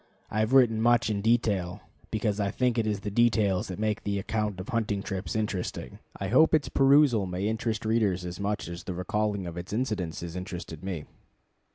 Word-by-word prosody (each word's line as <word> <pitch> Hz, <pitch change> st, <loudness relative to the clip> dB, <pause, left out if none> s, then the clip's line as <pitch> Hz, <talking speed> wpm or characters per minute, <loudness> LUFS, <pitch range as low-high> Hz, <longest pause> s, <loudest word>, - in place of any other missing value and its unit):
I 110 Hz, -, -1 dB
have 110 Hz, +2 st, +1 dB
written 120 Hz, -5 st, +5 dB
much 120 Hz, -1 st, +3 dB
in 100 Hz, -1 st, -1 dB
detail, 100 Hz, -5 st, +1 dB, 0.3 s
because 105 Hz, -1 st, -1 dB
I 100 Hz, -1 st, +1 dB
think 120 Hz, +2 st, +1 dB
it 110 Hz, -, 0 dB
is 105 Hz, -2 st, -1 dB
the 105 Hz, -1 st, -4 dB
details 105 Hz, -4 st, +2 dB
that 90 Hz, -, -6 dB
make 110 Hz, 0 st, -1 dB
the 100 Hz, -1 st, -2 dB
account 105 Hz, -1 st, -2 dB
of 95 Hz, -, -7 dB
hunting 110 Hz, -5 st, -1 dB
trips 95 Hz, 0 st, -4 dB
interesting. 105 Hz, -4 st, -3 dB, 0.2 s
I -, -, -2 dB
hope 160 Hz, +7 st, +5 dB
its 150 Hz, -, 0 dB
perusal 135 Hz, -7 st, +4 dB
may 90 Hz, +3 st, -2 dB
interest 110 Hz, 0 st, -2 dB
readers 105 Hz, -5 st, +1 dB
as 90 Hz, +1 st, -6 dB
much 100 Hz, -2 st, -2 dB
as 85 Hz, 0 st, -7 dB
the 90 Hz, -, -4 dB
recalling 105 Hz, +1 st, -1 dB
of 85 Hz, -1 st, -6 dB
its 90 Hz, +3 st, -6 dB
incidents 105 Hz, -8 st, -2 dB
has 85 Hz, 0 st, -6 dB
interested 90 Hz, -3 st, -6 dB
me. 90 Hz, -6 st, -4 dB
105 Hz, 200 wpm, -28 LUFS, 95-115 Hz, 0.3 s, written